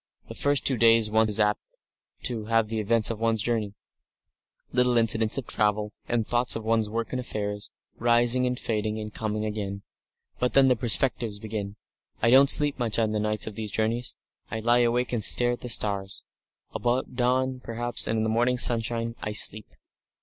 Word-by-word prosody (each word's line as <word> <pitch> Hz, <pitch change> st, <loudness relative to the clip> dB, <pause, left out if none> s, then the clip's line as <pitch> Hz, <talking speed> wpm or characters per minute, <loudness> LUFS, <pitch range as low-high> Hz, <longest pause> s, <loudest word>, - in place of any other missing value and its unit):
The -, -, -7 dB
first 145 Hz, -1 st, 0 dB
two 130 Hz, -, +2 dB
days 115 Hz, -1 st, +4 dB
one 110 Hz, 0 st, +2 dB
is 105 Hz, +1 st, +2 dB
apt 105 Hz, 0 st, +1 dB, 0.6 s
to 115 Hz, -3 st, -1 dB
have 115 Hz, -1 st, 0 dB
the 110 Hz, 0 st, -3 dB
events 110 Hz, +1 st, +1 dB
of 110 Hz, -, -6 dB
one's 115 Hz, -2 st, +1 dB
journey, 110 Hz, -4 st, -2 dB, 1.0 s
little 125 Hz, -1 st, +2 dB
incidents 110 Hz, 0 st, +3 dB
of 135 Hz, -, -4 dB
travel, 105 Hz, 0 st, -1 dB
and 115 Hz, -2 st, -1 dB
thoughts 120 Hz, +2 st, 0 dB
of 115 Hz, -1 st, -6 dB
one's 110 Hz, -1 st, 0 dB
work 115 Hz, 0 st, -4 dB
and 130 Hz, -, -2 dB
affairs, 105 Hz, -4 st, -5 dB, 0.3 s
rising 120 Hz, +2 st, +3 dB
and 125 Hz, 0 st, -3 dB
fading 110 Hz, -1 st, -3 dB
and 105 Hz, 0 st, -8 dB
coming 110 Hz, -1 st, -4 dB
again; 100 Hz, -2 st, -5 dB, 0.6 s
but 125 Hz, -, -1 dB
then 135 Hz, -1 st, +5 dB
the 125 Hz, -, +3 dB
perspectives 115 Hz, -2 st, +1 dB
begin. 105 Hz, -2 st, -6 dB, 0.4 s
I 115 Hz, -, +2 dB
don't 135 Hz, +2 st, +6 dB
sleep 145 Hz, -2 st, +3 dB
much 115 Hz, -3 st, -1 dB
at 110 Hz, -2 st, 0 dB
nights 105 Hz, 0 st, -1 dB
on 110 Hz, -, -7 dB
these 110 Hz, 0 st, -6 dB
journeys; 115 Hz, +4 st, -2 dB, 0.3 s
I 110 Hz, -, -4 dB
lie 120 Hz, +2 st, +2 dB
awake 120 Hz, +1 st, 0 dB
and 115 Hz, -3 st, 0 dB
stare 120 Hz, +3 st, +5 dB
at 120 Hz, -, -6 dB
the 125 Hz, -, -6 dB
stars. 100 Hz, -3 st, 0 dB, 0.5 s
About 125 Hz, +2 st, -2 dB
dawn, 130 Hz, +1 st, 0 dB
perhaps, 120 Hz, 0 st, 0 dB
and 115 Hz, -, -1 dB
in 110 Hz, -, 0 dB
the -, -, -1 dB
morning 120 Hz, +3 st, +1 dB
sunshine, 115 Hz, -1 st, +1 dB
I 105 Hz, -, -4 dB
sleep! 105 Hz, 0 st, +3 dB
115 Hz, 185 wpm, -25 LUFS, 110-120 Hz, 1.0 s, don't